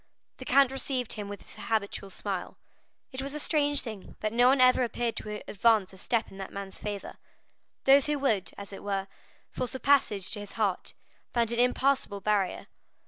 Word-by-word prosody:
The 260 - -9
count 270 0 +5
received 265 -2 -2
him 205 -1 -5
with 205 -1 -7
his 215 - -11
habitual 200 -3 -1
smile. 190 -1 -4 0.5
It 260 0 -4
was 275 +2 -4
a - - -3
strange 290 -2 +1
thing 215 -5 -8
that 215 0 -1
no 245 +1 +5
one 270 +1 +5
ever 255 0 +6
appeared 235 -1 -1
to 210 0 -5
advance 210 -2 +3
a - - -12
step 235 +1 0
in 195 - -11
that 195 - -6
man's 195 -1 -6
favor. 205 -2 -5 0.7
Those 275 +1 +6
who 295 0 +1
would, 225 -9 +1
as 200 0 -8
it - - -8
were, 195 -1 -2 0.4
force 250 0 -3
a - - -4
passage 235 -10 +3
to 215 - -2
his 205 -1 -8
heart, 205 -5 -1 0.4
found 235 -1 +2
an 235 - 0
impassable 250 -4 +2
barrier. 200 -2 0
225 Hz, 195 wpm, -29 LUFS, 200-260 Hz, 0.7 s, ever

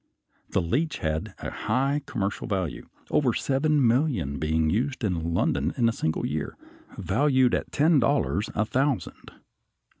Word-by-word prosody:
The 95 - 0
leech 140 - 0
had 80 0 -3
a - - -3
high 140 +3 0
commercial 100 -1 -3
value, 95 -7 -3 0.2
over 140 -6 +2
seven 140 +1 +2
million 115 - +1
being 80 +1 +1
used 130 +5 -1
in 85 -5 -1
London - - 0
in 115 - +3
a - - +3
single 80 -7 -1
year, - - -3 0.4
valued 130 -3 +2
at - - -1
ten 155 +1 +4
dollars 105 - +1
a 110 - +1
thousand. 135 +3 -1
120 Hz, 145 wpm, -26 LUFS, 85-140 Hz, 0.4 s, ten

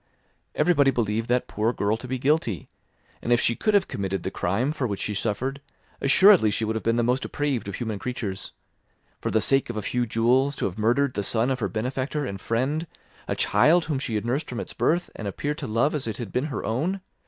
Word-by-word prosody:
Everybody 150 -3 +4
believed 115 -3 0
that 125 0 +1
poor 110 +3 0
girl 105 -1 0
to 125 - -9
be 130 +1 -2
guilty; 130 - 0 0.5
and 120 - -2
if 120 - +5
she 115 - +3
could 215 - +1
have 195 -2 +3
committed 95 -2 -3
the - - -3
crime 115 +11 0
for 140 -5 -2
which 100 -3 -3
she 105 - -2
suffered, 130 +7 -2 0.4
assuredly 175 - +6
she 110 +2 -1
would 110 +1 -2
have 110 - -1
been 115 0 +1
the 120 - +2
most 125 +3 +1
depraved 140 -9 -2
of 100 - -4
human 110 -4 -3
creatures. 105 -6 -4 0.7
For - - -2
the 110 - +2
sake 135 +2 +2
of 120 - -4
a 105 - -3
few 120 +3 -1
jewels, 125 +5 +2
to - - -2
have 95 +2 -4
murdered 125 +5 +2
the 100 - -1
son 115 +5 +1
of 130 - -1
her 100 -4 -1
benefactor 130 - -2
and 100 -5 -5
friend, 140 +8 -1 0.4
a - - -1
child 170 +2 +4
whom 150 -4 -1
she 120 -5 -3
had 105 - -1
nursed 135 +6 -1
from 120 - -4
its - - -6
birth, 175 +2 0
and 105 - -5
appeared 145 +9 -3
to - - -4
love 115 +7 +1
as 145 -6 -3
if 110 - -2
it - - -12
had 115 -6 -6
been 125 +3 0
her 145 -3 -4
own! 165 - -1
120 Hz, 235 wpm, -25 LUFS, 110-140 Hz, 0.7 s, assuredly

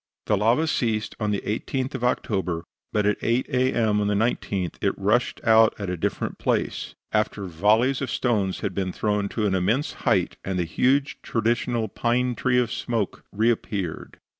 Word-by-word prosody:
The 105 - +2
lava 115 +10 +3
ceased 115 -8 -1
on 105 -2 0
the 100 -1 0
18th 130 +5 -2
of 130 -2 -4
October, 95 -8 0 0.3
but 105 -1 +1
at 105 0 +2
8 120 +2 +1
A. 130 0 +2
M. 110 -3 +2
on 105 - +1
the 105 - +1
19th 100 -5 -1
it - - +1
rushed - - +1
out 110 0 +5
at 100 -4 -3
a - - -1
different 80 - -3
place, - - -1 0.2
after 105 -2 0
volleys 110 - +2
of 135 - -2
stones 105 -8 0
had 100 -3 -2
been 95 0 -1
thrown 105 0 -1
to 110 - -1
an 100 - +1
immense 105 +10 +1
height, - - +1
and 95 -1 -2
the 90 - 0
huge 135 - +1
traditional 115 0 0
pine 120 +4 0
tree 125 +1 +1
of 125 -2 +2
smoke 115 -5 -2
reappeared. 105 -5 -1
110 Hz, 180 wpm, -25 LUFS, 100-120 Hz, 0.3 s, out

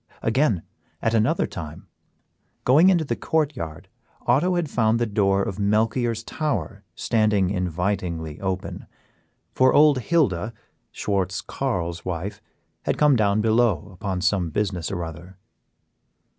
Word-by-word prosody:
Again, 115 - +2 0.4
at 115 - 0
another 115 +9 +2
time, 75 -4 -8 0.8
going 155 +9 +6
into 175 -4 +3
the 120 - -1
court 155 0 0
yard, 80 -9 -7 0.4
Otto 155 +10 +3
had 175 -3 0
found 115 -4 +2
the 120 - +1
door 100 -2 +2
of 100 +1 -4
Melchior's 110 +3 +1
tower 130 - -3
standing 105 -4 +1
invitingly 90 -3 -2
open, 95 -1 -4 0.7
for 130 0 +4
old 150 -2 +6
Hilda, 115 - +1 0.4
Schwartz 95 -3 -1
Carl's 85 -11 -3
wife, 90 +3 -4 0.4
had - - 0
come 150 -2 +5
down 105 -2 +2
below 110 -5 +2
upon 95 0 -3
some 95 -3 +1
business 90 -2 -2
or 90 -3 -3
other. 85 +3 -9
105 Hz, 130 wpm, -24 LUFS, 90-125 Hz, 0.8 s, going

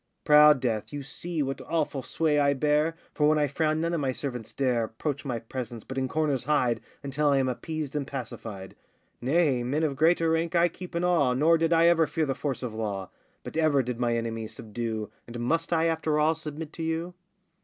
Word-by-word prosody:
Proud 150 -1 +7
Death, 115 -5 -1
you 145 -1 -5
see 165 +2 -3
what 135 0 -4
awful 155 -4 -1
sway 150 +1 +1
I 140 -1 +3
bear, 150 +3 +2 0.2
For 150 0 +3
when 155 - +3
I 150 - +3
frown 155 +2 0
none 170 +1 0
of 165 - 0
my 135 -2 +1
servants 125 -4 -5
dare 125 -4 +1
Approach 140 +6 -4
my 125 -4 -2
presence, 115 0 -6
but 130 - -8
in 130 -1 0
corners 145 -3 0
hide 125 -6 +1 0.2
Until 140 +2 0
I 140 - +4
am 135 -1 +2
appeased 150 +3 -4
and 140 -2 -2
pacified. 110 -7 -7 0.5
Nay, 140 -1 +2
men 140 +6 -1
of 145 -3 0
greater 165 +2 +3
rank 165 +1 0
I 170 +1 +4
keep 180 +1 -10
in 170 - 0
awe 155 -8 +3
Nor 160 +5 +4
did 165 0 +1
I 165 0 +5
ever 165 -2 +5
fear 160 - 0
the 135 - -1
force 135 -2 -3
of 120 -3 -4
law, 100 -4 -4 0.3
But - - -8
ever 155 -4 +3
did 125 -1 -4
my 120 -1 +1
enemies 115 -1 -4
subdue, 110 -1 -4 0.2
And 120 0 -7
must 165 +9 0
I 165 -1 +3
after 160 -2 +1
all 155 +1 +4
submit 155 0 -7
to - - -7
you? 165 +2 -2
145 Hz, 215 wpm, -27 LUFS, 125-160 Hz, 0.5 s, Proud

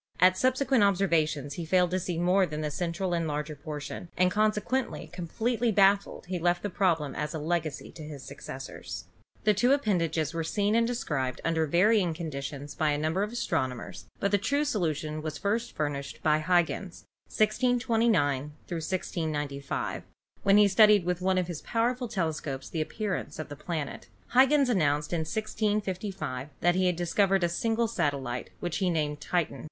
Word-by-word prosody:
At 185 +1 +6
subsequent 260 +1 +2
observations 165 -8 +1
he 170 - -5
failed 180 +2 +2
to 185 - +1
see 175 -1 -3
more 180 +2 +3
than 150 -1 -4
the 150 -1 -2
central 175 +3 -2
and 165 -1 0
larger 150 0 -3
portion, 150 +4 -7
and, 185 0 +4
consequently, 215 +5 0
completely 225 +7 -1
baffled, 200 0 +3
he 180 0 -3
left 175 +1 +1
the 205 - -2
problem 165 -8 +1
as 150 +1 -3
a - - -1
legacy 155 -1 -2
to - - -11
his 150 -3 -8
successors. 135 0 -7 0.4
The 215 - +4
two 245 +6 +3
appendages 170 - 0
were 165 0 -1
seen 205 +5 0
and 230 0 +3
described 145 - -2
under 160 -1 +1
varying 180 +1 +3
conditions 145 -3 -5
by 155 -2 +1
a 145 - +1
number 155 +5 0
of 210 +1 -1
astronomers, 130 - -3
but 200 - 0
the 205 - +3
true 285 +8 +1
solution 155 - -1
was 155 -1 -4
first 220 +7 -1
furnished 145 -2 -3
by 155 -1 +4
Huygens 175 +2 0 0.2
(1629 220 - +2
1695), 155 -5 -3 0.4
when 200 -1 +5
he 210 -1 +7
studied 210 -1 +6
with 180 0 -1
one 190 0 +2
of 180 - +2
his 170 -3 -6
powerful 245 +2 0
telescopes 160 - -3
the 160 - -1
appearance 180 -1 -3
of 155 - -6
the 145 - -6
planet. 155 -1 -5 0.2
Huygens 270 +2 +5
announced 150 -8 +1
in 170 - +1
1655 200 - -2
that 175 0 +4
he 185 0 +2
had 180 - +2
discovered 190 +2 +2
a - - +4
single 225 +6 0
satellite, 135 - -2
which 175 -2 -2
he 190 -2 +1
named 150 -3 -1
Titan. 175 +1 -1
175 Hz, 170 wpm, -28 LUFS, 155-205 Hz, 0.4 s, he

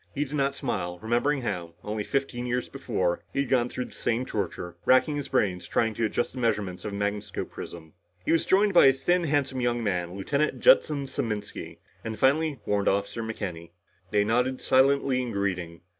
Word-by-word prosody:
He 145 +1 0
did 140 - -10
not 140 -1 +1
smile, 90 -8 -3
remembering 120 +7 0
how, 85 -6 -4
only 105 0 -3
fifteen 125 -1 -2
years 125 0 -1
before, 95 -10 -1
he 140 - 0
had 140 - -3
gone 125 -2 +2
through 125 - -4
the - - -13
same 120 +2 -1
torture, 90 -6 -4
racking 130 +4 +4
his 145 -2 -3
brains 100 -8 0
trying 115 -1 +1
to 115 +2 0
adjust 105 - -1
the 130 - -6
measurements 105 -6 -1
of 105 - -4
a - - -5
magnascope 100 +1 -3
prism. 80 -2 -9 0.3
He - - +1
was 165 -1 +2
joined 200 +1 +4
by 175 - +8
a 135 - +6
thin 175 +6 +1
handsome 140 -3 0
young 120 -1 0
man, 90 -4 -1
Lieutenant 140 +10 0
Judson 155 - +4
Saminsky, 110 -6 -4 0.3
and 110 -1 -4
finally, 145 +1 +2
Warrant 100 -1 0
Officer 100 +3 -1
McKenny. 90 -7 -5 0.4
They 105 0 +3
nodded 125 +4 +1
silently 135 -1 +3
in 125 -2 -3
greeting. 90 -4 -2
120 Hz, 190 wpm, -27 LUFS, 100-135 Hz, 0.4 s, by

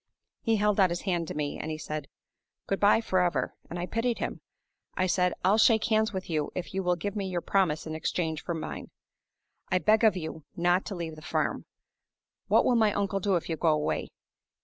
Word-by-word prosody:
He 225 - +2
held 210 -1 +2
out 190 -2 +6
his 175 +1 -3
hand 175 -4 -1
to - - -5
me; 150 -1 -3
and 155 - -4
he 155 - -3
said, 150 -2 -5 0.6
'Good 195 - -1
by 205 +2 +5
forever!' 180 -5 +1 0.2
and 175 - -5
I 175 - -2
pitied 230 +4 -1
him. - - -4 0.6
I 185 - +2
said, 180 -1 +1
'I'll 205 +4 +4
shake 220 -1 +5
hands 220 0 +2
with 190 -2 -5
you 155 -3 -1
if 180 - -5
you 195 - 0
will 180 -1 +1
give 200 +4 -4
me 200 -2 -2
your 175 -2 -2
promise 175 -6 +1
in 160 - -5
exchange 160 0 -2
for 170 - -3
mine. 160 - -6 0.8
I 185 - +3
beg 215 +6 +3
of 215 -4 +5
you 160 -2 -6
not 175 +2 +2
to 200 - -5
leave 165 -2 -5
the - - -11
farm. 175 - -1 0.8
What - - +4
will - - +4
my 220 -3 +4
uncle 200 -1 0
do 195 0 +1
if 170 - -1
you 160 - -2
go 170 - 0
away? 150 -1 0
180 Hz, 215 wpm, -28 LUFS, 165-205 Hz, 0.8 s, out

